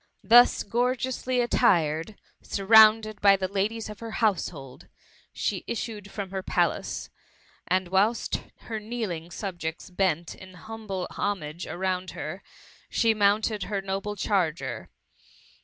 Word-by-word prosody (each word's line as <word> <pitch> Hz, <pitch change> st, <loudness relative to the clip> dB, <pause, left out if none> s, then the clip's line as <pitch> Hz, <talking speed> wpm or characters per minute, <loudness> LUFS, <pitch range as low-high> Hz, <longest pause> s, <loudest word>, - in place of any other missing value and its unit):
Thus 240 Hz, +5 st, +6 dB
gorgeously 250 Hz, +3 st, -1 dB
attired^ 170 Hz, -5 st, +2 dB, 0.3 s
surrounded 215 Hz, +1 st, +5 dB
by 200 Hz, -1 st, +7 dB
the 190 Hz, -1 st, -2 dB
ladies 205 Hz, +4 st, -2 dB
of 210 Hz, -1 st, -9 dB
her 230 Hz, -1 st, -7 dB
household, 170 Hz, -, -2 dB, 0.4 s
she -, -, -2 dB
issued 215 Hz, -3 st, -5 dB
from 195 Hz, -2 st, -6 dB
her 190 Hz, -1 st, -3 dB
palace; -, -, -1 dB, 0.6 s
and 185 Hz, 0 st, +1 dB
whilst 205 Hz, +5 st, +1 dB, 0.2 s
her 220 Hz, -2 st, -5 dB
kneeling 210 Hz, -7 st, -4 dB
subjects 175 Hz, -3 st, -5 dB
bent 175 Hz, -3 st, 0 dB
in 185 Hz, -1 st, -13 dB
hum 220 Hz, +4 st, -10 dB
ble 190 Hz, -2 st, -2 dB
homage 175 Hz, -5 st, -3 dB
around 185 Hz, 0 st, -2 dB
her, 155 Hz, +6 st, -5 dB, 0.5 s
she 225 Hz, -2 st, +3 dB
mounted 210 Hz, 0 st, +2 dB
her 200 Hz, -2 st, -3 dB
m> 195 Hz, 0 st, 0 dB
ble 210 Hz, +1 st, -5 dB
charger. 185 Hz, -5 st, -1 dB
200 Hz, 125 wpm, -26 LUFS, 185-220 Hz, 0.6 s, by